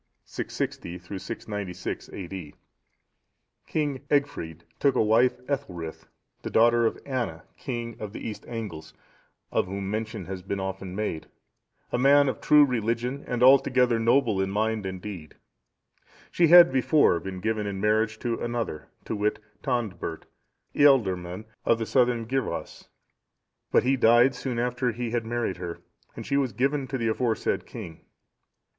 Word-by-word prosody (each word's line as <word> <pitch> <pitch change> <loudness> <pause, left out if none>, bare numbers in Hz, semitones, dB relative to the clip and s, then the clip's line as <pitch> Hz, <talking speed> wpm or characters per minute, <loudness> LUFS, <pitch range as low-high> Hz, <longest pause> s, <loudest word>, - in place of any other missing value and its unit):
[660 85 +1 -4
696 95 0 -6
A.D.] 90 -4 -7 1.1
King 145 -4 -1
Egfrid 110 - -1 0.2
took 140 -2 +3
to - - +2
wife 115 +4 +3
Ethelthryth, 90 - -4 0.3
the - - -5
daughter 120 0 +4
of - - -3
Anna,(660) 120 - -3 0.2
king 120 -2 -5
of 105 -2 -5
the - - -7
East 110 - -6
Angles, 100 -10 -7 0.6
of - - +1
whom 95 +1 -4
mention 110 -2 -4
has 95 0 -6
been 100 +2 -4
often 95 -1 -5
made; 100 -6 -3 0.6
a 120 - 0
man 140 +2 +6
of 130 - -2
true 150 -1 +6
religion, 120 +2 -2
and 125 0 0
altogether 130 -3 +5
noble 115 -3 +3
in 95 - -1
mind 110 0 -1
and 95 -1 -6
deed. 90 -7 -8 1.0
She 170 - +4
had 175 -2 +9
before 130 - +3
been 95 +2 -6
given 110 +1 -1
in 100 -1 -4
marriage 110 +1 +1
to 120 -2 -1
another, 120 -9 -3 0.2
to - - -3
wit, 105 +1 0 0.2
Tondbert, 110 - -3 0.5
ealdorman(661) 105 -9 +3 0.2
of 115 - +3
the 115 - -3
Southern 120 -2 +2
Gyrwas; 130 0 -3 0.8
but - - +4
he 130 +2 +3
died 120 +1 +5
soon 125 -1 -4
after 125 +1 0
he 120 0 -4
had 115 -1 -1
married 120 -6 -2
her, 90 -2 -6 0.4
and - - -7
she 140 - 0
was 130 -5 0
given 135 +4 0
to 135 - -3
the 115 -2 -1
aforesaid 115 0 -1
king. 80 -1 -9
115 Hz, 150 wpm, -26 LUFS, 95-125 Hz, 1.1 s, had